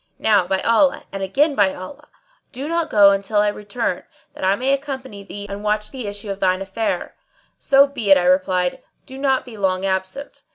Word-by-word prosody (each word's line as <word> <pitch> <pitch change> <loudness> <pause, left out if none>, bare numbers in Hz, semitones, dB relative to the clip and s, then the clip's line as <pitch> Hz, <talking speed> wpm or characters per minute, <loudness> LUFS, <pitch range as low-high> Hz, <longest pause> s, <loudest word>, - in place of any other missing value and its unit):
Now 205 -5 +2
by 190 - +1
Allah! 265 +5 +2
and 195 - -5
again 280 - +1
by 200 -7 +2
Allah! 285 +11 -10 0.4
do 270 +4 -6
not 335 0 -1
go 200 -2 +6
till 205 +2 -3
I 210 - +2
return, 205 -2 -3 0.3
that - - -9
I 190 +1 +3
may 260 +5 0
accompany 265 -7 -5
thee 200 +1 -8
and 200 +1 -7
watch 210 0 -1
the 255 -5 -6
issue 205 0 -5
of 195 - -6
thine 185 -1 +1
affair." 205 +3 -3 0.4
"So 275 0 +5
be 255 -7 -4
it," 195 - +8
I 180 - +1
replied, 185 +5 +1 0.2
"do 265 0 -10
not 270 -2 +1
be 235 -4 -11
long 190 -1 0
absent." 190 +8 -4
205 Hz, 200 wpm, -20 LUFS, 195-265 Hz, 0.4 s, it